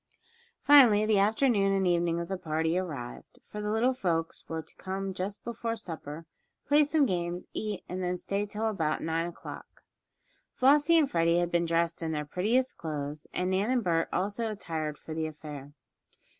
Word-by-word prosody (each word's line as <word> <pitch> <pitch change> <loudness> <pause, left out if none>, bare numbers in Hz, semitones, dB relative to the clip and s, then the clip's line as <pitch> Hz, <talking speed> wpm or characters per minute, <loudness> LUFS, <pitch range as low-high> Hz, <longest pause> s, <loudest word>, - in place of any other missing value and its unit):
Finally 240 -8 +7
the 215 -2 +3
afternoon 210 -1 +3
and 195 -1 +2
evening 170 -1 +1
of 170 - -4
the 190 - -2
party 160 -1 -1
arrived, 145 -10 -5
for 210 - -7
the 210 - -2
little 230 +4 +2
folks 165 -9 -2
were 160 0 -3
to - - -16
come 190 0 -4
just 195 +3 -5
before 230 0 -3
supper, 165 -6 -7 0.4
play 295 +1 +5
some 295 0 +3
games, 175 -4 -2
eat, 210 -3 -3
and 185 +1 -4
then 180 0 -1
stay 200 +3 -2
until 210 +2 -2
about 165 -8 -1
nine 165 +1 0
o'clock. 175 - -10 0.7
Flossie 290 +5 +5
and 295 -4 +3
Freddie 170 0 +3
had 175 0 0
been 170 0 +1
dressed 170 0 0
in 160 -1 -2
their 150 -1 -2
prettiest 225 - 0
clothes, 150 -1 -5
and 180 +1 -1
Nan 195 +4 +1
and 255 -2 +2
Bert 165 -3 +1
also 205 +4 -1
attired 160 -7 -4
for 160 - -8
the 160 0 -1
affair. 150 -2 -9
180 Hz, 180 wpm, -29 LUFS, 165-215 Hz, 0.7 s, Finally